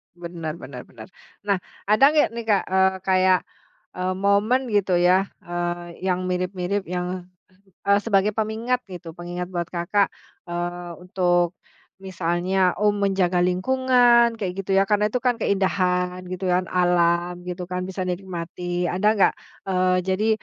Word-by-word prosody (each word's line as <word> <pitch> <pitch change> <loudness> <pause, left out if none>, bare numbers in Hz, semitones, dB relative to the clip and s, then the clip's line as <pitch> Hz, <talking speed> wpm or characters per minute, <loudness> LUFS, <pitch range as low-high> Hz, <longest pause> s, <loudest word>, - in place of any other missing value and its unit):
Benar 170 -2 -6
benar 130 -5 -10
benar. 110 -3 -12 0.4
Nah 200 -3 +1 0.2
ada 215 +6 +2
nggak 300 -5 +3
nih, 235 0 -5
Kak, 205 -3 +3
eee, 190 0 +4
kayak, 185 -1 +4 0.6
eee, 185 +1 -1
momen 210 +6 +1
gitu 195 -3 +2
ya, 180 +2 +3 0.2
eee, 175 0 -4
yang 185 0 0
mirip 185 +1 -2
mirip 190 +2 -2
yang, 180 0 -4 0.6
eee, 200 0 +5
sebagai 200 -2 +3
pengingat 225 +3 -1
gitu, 175 -3 -10
pengingat 175 +1 -5
buat 175 -2 -2
Kakak, 180 +4 0 0.3
eee, 175 0 -4
untuk 175 -1 +1 0.4
misalnya, 185 0 0
oh 210 0 +3
menjaga 190 -3 +1
lingkungan 235 +4 +3
kayak 190 -4 -3
gitu 195 - -19
ya 195 - +4
karena 210 +1 +2
tuh 250 - -1
kan 245 0 +1
keindahan 185 -2 0
gitu 185 +1 -4
kan, 180 0 +1
alam 175 0 +1
gitu 180 0 -6
kan, 180 0 -4
bisa 185 0 -4
dinikmati, 175 -1 -4
ada 190 +4 0
nggak? 195 - +4 0.3
Eee, 185 -1 +2
jadi 195 +4 +1
185 Hz, 145 wpm, -23 LUFS, 175-200 Hz, 0.6 s, eee